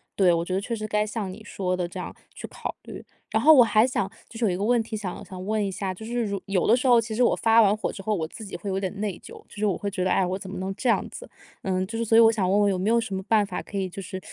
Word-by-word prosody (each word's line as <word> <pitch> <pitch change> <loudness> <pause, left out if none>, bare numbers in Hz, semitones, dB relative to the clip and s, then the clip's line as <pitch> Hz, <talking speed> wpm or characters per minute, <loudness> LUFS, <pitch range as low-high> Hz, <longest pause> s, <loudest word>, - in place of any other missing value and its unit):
对。 185 -3 +4
我 170 0 0
觉 185 - -4
得 190 - +1
确 230 +4 -3
实 215 -1 -5
该 210 0 +1
像 210 -3 -4
你 185 - -11
说 185 -3 -2
的 180 -1 -1
这 - - -8
样 - - -6 0.2
去 - - -8
考 - - -6
虑。 - - -9 0.3
然 - - +1
后 315 - +9
我 265 - +8
还 220 -1 +4
想 225 -6 -1 0.2
就 225 - -9
是 235 - +2
有 200 - +2
一 - - -1
个 195 - -3
问 240 +2 +3
题 220 0 -6
想 200 -4 -5
想 185 -1 -8
问 215 +1 0
一 - - -1
下， 190 0 -3
就 220 +4 -10
是 240 +1 -1
如 200 -2 -3
有 195 -3 0
的 225 - +5
时 255 +1 -1
候 240 -2 +6
其 220 0 -5
实 230 - -1
我 245 - +4
发 225 0 +5
完 205 -1 +4
火 215 - -3
之 - - -9
后， 215 +2 0
我 165 -4 -2
自 220 - -9
己 195 - -7
会 200 - -5
有 190 0 -1
点 195 +1 -4
内 205 -4 -3
疚。 - - -12 0.2
就 - - -15
是 210 - 0
我 200 - +1
会 200 - -4
觉 185 -1 -2
得- 185 - +1
哎， 190 - +3
我 185 +2 -3
怎 190 - -9
么 190 - -6
能 190 +1 -3
这 255 - -3
样 230 - +3
子？ - - -10 0.3
嗯， 185 -1 0
就 220 +4 -6
是 230 - -1
所 225 +1 +4
以 - - +9
我 225 0 +7
想 195 -5 0
问 205 +2 +3
问 205 - +3
有 190 - -1
没 190 +4 0
有 235 +1 +4
什 220 -3 -5
么 190 - -2
办 215 -2 +3
法 200 - -5
可 200 - -7
以 190 -1 -1
就 195 - -7
是 185 0 -7
205 Hz, 375 characters per minute, -25 LUFS, 190-225 Hz, 0.3 s, 后